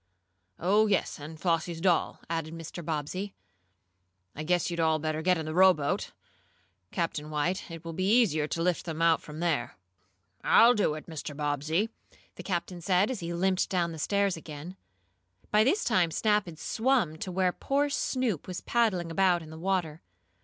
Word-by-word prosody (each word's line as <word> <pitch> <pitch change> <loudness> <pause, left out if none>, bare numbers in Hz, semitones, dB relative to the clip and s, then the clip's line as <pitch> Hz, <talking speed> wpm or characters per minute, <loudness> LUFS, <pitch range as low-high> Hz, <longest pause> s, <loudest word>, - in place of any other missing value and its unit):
"Oh, 205 +5 +3
yes, 195 -6 0
and 155 +2 -9
Flossie's 165 -1 0
doll," 175 -1 +1
added 165 -1 -3
Mr. 165 +1 -7
Bobbsey. 165 +6 -3 1.0
"I 150 - -5
guess 175 +2 +1
you'd 170 - -3
better 155 -1 +1
get 180 +2 +3
in 160 - -4
the 155 - -4
rowboat, 180 -5 +3 0.8
Captain 155 - -3
White. 155 +6 -1
It 165 0 -9
will 165 - -5
be 185 +4 0
easier 155 -10 +2
to 165 +1 -2
lift 180 -1 0
them 165 -2 -5
out 165 -1 +4
from 155 +1 -9
there." 150 -9 -1 0.7
"I'll 235 +2 +7
do 205 -9 +1
it, 155 - -8
Mr. 150 -3 -7
Bobbsey," 150 +7 0 0.4
the - - -9
captain 175 -1 -3
said, 185 +6 +2
as 250 - -4
he 170 0 -4
limped 185 +2 +1
down 170 -3 0
stairs 200 +5 +1
again. 160 +2 -9 0.8
By 210 +1 +5
this 380 - +2
time 175 -2 +2
Snap 210 +3 +1
had 165 -2 -9
swum 225 - +1
to 185 - -5
where 185 0 +2
poor 285 +1 0
Snoop 255 - -1
was 180 -1 -5
paddling 195 -8 +1
about 180 -1 +2
in 155 - -11
the 160 - -9
water. 175 -4 -1
170 Hz, 170 wpm, -29 LUFS, 160-190 Hz, 1.0 s, I'll